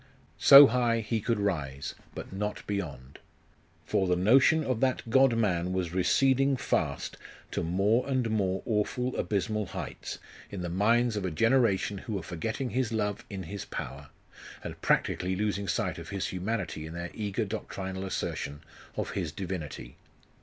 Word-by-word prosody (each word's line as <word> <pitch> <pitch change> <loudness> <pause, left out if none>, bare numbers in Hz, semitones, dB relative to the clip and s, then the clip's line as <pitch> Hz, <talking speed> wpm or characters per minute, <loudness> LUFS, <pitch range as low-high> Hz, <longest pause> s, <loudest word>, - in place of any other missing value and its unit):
So 140 +1 +11
high 120 -2 +2
he 110 +1 -1
could 115 0 0
rise, 75 -9 -2 0.2
but - - -7
not 105 +2 -3
beyond. 70 -10 -5 0.7
For 100 -3 +1
the 90 - +3
notion 130 - +5
of 130 -5 -1
that 130 -2 0
God 130 -1 +5
man 90 -5 +1
was 90 -3 -2
receding 135 +9 +3
fast 75 - -1 0.3
to - - -1
more 100 +10 +1
and 130 -3 +1
more 95 -3 0
awful 125 +3 -1
abysmal 105 0 -1
heights, - - -6 0.3
in 100 - -6
the 90 - -3
minds 115 +6 +2
of 105 - -2
a 95 - 0
generation 105 +1 +2
who 110 - -6
were 95 -4 -3
forgetting 110 +10 -3
His 125 -2 0
love 105 -2 -1
in 95 -2 -5
His 100 +4 -6
power, 70 +2 -7 0.5
and - - -7
practically 95 +1 +1
losing 100 0 -1
sight 85 - -1
of - - -9
His 100 -2 -2
humanity 95 -5 -3
in 80 - -8
their 85 0 -5
eager 105 +1 -2
doctrinal 95 -2 -5
assertion 75 -6 -3 0.4
of - - -2
His 85 -6 -3
Divinity. 85 -4 -6
100 Hz, 160 wpm, -29 LUFS, 90-115 Hz, 0.7 s, So